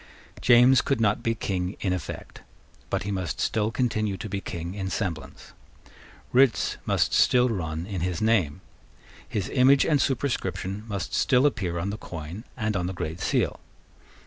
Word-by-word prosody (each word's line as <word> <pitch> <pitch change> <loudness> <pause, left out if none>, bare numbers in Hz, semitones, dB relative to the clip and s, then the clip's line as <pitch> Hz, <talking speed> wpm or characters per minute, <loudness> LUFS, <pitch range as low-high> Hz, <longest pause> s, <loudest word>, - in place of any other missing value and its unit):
James 125 +2 +6
could 135 - 0
not 105 -2 +2
be 115 0 0
King 95 -3 -3
in 95 -3 0
effect: 90 -4 -6 0.5
but - - -1
he 100 - -3
must 95 -5 -3
still 110 -1 +1
continue 110 -4 -1
to 110 - -6
be 100 -1 -3
King 85 -1 -5
in 95 -2 -4
semblance. 90 -7 -5 0.8
Writs 130 -2 +3
must - - +2
still 125 0 +4
run 80 -6 -3
in 95 -3 -4
his 90 -1 -1
name. 95 -8 +1 0.7
His 100 -3 -2
image 135 +1 +5
and 150 -4 +3
superscription 105 -7 -2
must 100 -3 -4
still 130 +1 +3
appear 95 -11 0
on 90 +4 -2
the 105 - -6
coin 85 +6 -7
and 110 -3 -1
on 90 -1 -1
the 95 - -3
Great 80 -1 -5
Seal. - - 0
100 Hz, 165 wpm, -26 LUFS, 90-115 Hz, 0.8 s, James